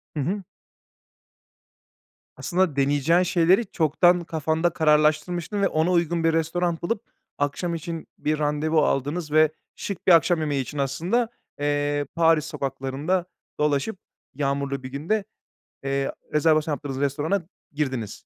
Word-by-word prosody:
Hı - - -2
hı. 190 +8 -1 1.9
Aslında 180 -5 0
deneyeceğin 145 +5 +3
şeyleri 180 +5 +3
çoktan 175 +3 +3
kafanda 160 +1 0
kararlaştırmıştın 160 +5 +2
ve 195 - +4
ona 160 +3 +1
uygun 170 -1 +1
bir 165 0 +3
restoran 165 +1 0
bulup, 210 +5 -1 0.4
akşam 170 +4 -1
için 165 0 -6
bir 155 0 -1
randevu 150 +1 +1
aldınız 150 +4 -1
ve 155 0 +5 0.2
şık 195 -3 -6
bir - - +7
akşam 170 0 +5
yemeği 145 -3 0
için, 145 +3 -7
aslında, 170 - 0 0.3
eee, 145 0 0
Paris 165 -2 +4
sokaklarında 140 +4 -2 0.3
dolaşıp, 150 +7 0 0.4
yağmurlu 140 -1 -1
bir 130 - -6
günde, 175 +10 -1 0.6
eee, 135 0 -1 0.2
rezervasyon 155 0 +3
yaptığınız 135 -2 -5
restorana 150 +7 0 0.3
girdiniz. 130 -8 -2
155 Hz, 125 wpm, -24 LUFS, 145-175 Hz, 1.9 s, bir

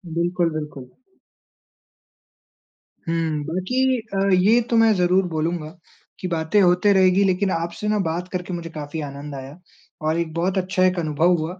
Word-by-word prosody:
बिल्कुल, 175 0 +1
बिल्कुल। 150 -5 -6 2.2
हुँ, 160 -3 -1
बाकी 250 +10 0 0.2
अ, 195 0 +1
ये 205 +6 +5
तो 235 - +1
मैं 225 -1 +5
ज़रूर 180 +1 +3
बोलूँगा 160 0 -2 0.5
कि 185 - -3
बातें 165 +4 +1
होते 180 +3 +4
रहेगी 190 +1 +4
लेकिन 190 0 +1
आपसे 170 +5 -3
ना 210 0 +1
बात 170 +3 -2
करके 180 0 -4
मुझे 170 -1 -5
काफ़ी 155 0 -6
आनंद 140 +1 -8
आया 135 +4 -9 0.5
और 155 +2 +1
एक 160 -2 -3
बहुत 180 +3 -1
अच्छा 185 0 0
एक 185 -1 +1
अनुभव 160 +3 +2
हुआ 170 +4 -5
175 Hz, 155 wpm, -22 LUFS, 160-185 Hz, 2.2 s, ये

